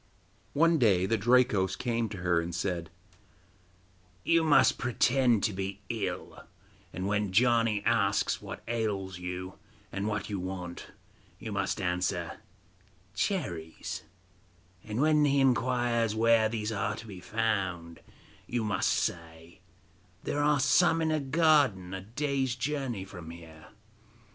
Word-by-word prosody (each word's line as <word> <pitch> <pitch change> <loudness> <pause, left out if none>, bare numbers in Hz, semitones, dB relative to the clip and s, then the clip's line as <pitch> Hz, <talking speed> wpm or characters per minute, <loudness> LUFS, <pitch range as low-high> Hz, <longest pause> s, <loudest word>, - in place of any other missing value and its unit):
One 165 +2 +4
day 95 -7 +4
the 115 - +1
Drakos 110 -4 +3
came 115 +1 -1
to 100 - -7
her, 85 -2 +2
and 85 0 -5
said: 90 -2 -2 1.3
'You 165 -1 +3
must 150 -3 +4
pretend 125 -2 +2
to 105 - +1
be 95 +1 -5
ill, - - -4 0.5
and 95 - -4
when 105 -1 0
Janni 115 -1 +3
asks 105 -4 +1
what - - -8
ails 100 -5 -2
you, 90 +1 -6 0.3
and 100 +1 -3
what 105 -1 -2
you 100 -2 -3
want, 90 -1 -6 0.5
you - - -7
must - - -1
answer: 90 -1 -2 0.7
"Cherries," 85 - -3 0.8
and 110 +2 -4
when 155 0 +4
he 140 -1 +3
inquires 120 -3 +2
where 115 0 +4
these 110 -1 -3
are 105 0 -1
to 115 - -9
be 100 -4 -9
found, 95 -6 -2 0.5
you 120 -1 -1
must 100 -4 0
say: 85 0 -3 0.6
"There 145 - -1
are 145 -1 +3
some 165 +4 +4
in 160 - +1
a 155 - +1
garden 140 - +2
a 95 - -4
day's 135 +4 -2
journey 130 -6 -3
from 90 -4 -10
here." 80 -2 -12
110 Hz, 135 wpm, -29 LUFS, 95-125 Hz, 1.3 s, One